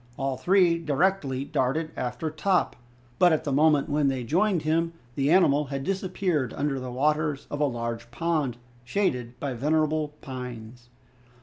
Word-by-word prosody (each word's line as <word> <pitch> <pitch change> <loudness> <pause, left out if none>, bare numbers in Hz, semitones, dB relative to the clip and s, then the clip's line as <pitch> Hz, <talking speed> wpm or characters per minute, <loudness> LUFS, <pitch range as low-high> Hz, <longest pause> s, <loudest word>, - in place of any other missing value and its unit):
All 135 -1 -1
three 175 +2 +3
directly 150 -3 0
darted 155 +5 -1
after 125 +6 -3
Top, 180 +4 +1 0.4
but 180 - +6
at 160 -1 +1
the 145 - -2
moment 150 +1 +4
when 150 -1 +1
they 130 -2 -1
joined 180 - +1
him 165 +2 +1 0.2
the 140 +2 0
animal 150 -4 +4
had 135 0 -4
disappeared 180 - -1
under 140 -2 -1
the 130 0 -6
waters 150 +3 0
of 145 - -3
a - - +4
large 115 -2 -4
pond 150 -2 -1 0.3
shaded 125 - -1
by 140 -2 -3
venerable 155 +3 0
pines. 125 -3 -8
145 Hz, 150 wpm, -26 LUFS, 130-165 Hz, 0.4 s, but